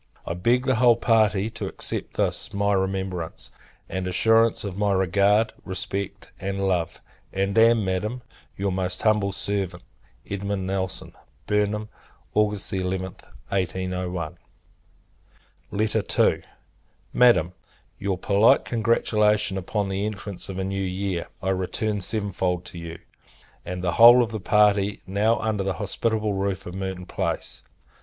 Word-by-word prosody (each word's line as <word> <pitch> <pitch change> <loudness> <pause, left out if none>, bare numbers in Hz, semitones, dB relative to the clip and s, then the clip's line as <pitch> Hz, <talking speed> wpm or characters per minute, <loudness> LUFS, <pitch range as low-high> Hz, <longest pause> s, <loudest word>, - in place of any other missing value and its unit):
I - - -2
beg 120 +9 +1
the 130 -3 +2
whole 120 0 +6
party 110 -2 +2
to 110 -3 -4
accept - - -5
this - - -1
my 100 0 +2
remembrance; 95 -3 -2 0.4
and 95 -1 -3
assurance 115 +5 +3
of 100 -3 -5
my 100 0 +1
regard, 100 +4 +3
respect, 95 +1 -4
and 100 0 -2
love: 90 -3 -1 0.3
and 95 +1 -1
am, 115 -1 +5
Madam, 105 +7 -2 0.3
your 100 0 -1
most 90 0 -2
humble 105 -2 +3
servant, 95 -3 -2 0.4
EDM. 100 0 -3
NELSON. 95 -1 -3 0.3
Burnham, 105 +1 0 0.4
August 105 -2 0
11th, 95 0 -4 0.2
[1801.] 90 -3 -2 1.3
II. 110 0 +1 0.7
Madam, 120 -8 +4 0.5
Your 95 -2 -1
polite 100 +4 +4
congratulation 105 -3 +2
upon 100 +2 -2
the 95 +1 -2
entrance 100 -3 -6
of 95 - -5
a 95 - -1
new 95 +1 -2
year, 95 -1 -2 0.2
I 95 - 0
return 100 +3 -1
seven 100 +1 -1
fold 90 -1 -1
to 85 - -9
you, 85 0 -7 0.7
and 90 0 -5
the 90 - +1
whole 120 +6 +8
of 115 - -4
the 110 - -4
party 105 0 +2
now 105 +4 +2
under 110 -3 -1
the 95 0 -1
hospitable 110 +4 -1
roof 95 -1 -2
of 90 - -7
Merton 95 -1 -4
Place. - - -3
100 Hz, 135 wpm, -24 LUFS, 95-105 Hz, 1.3 s, whole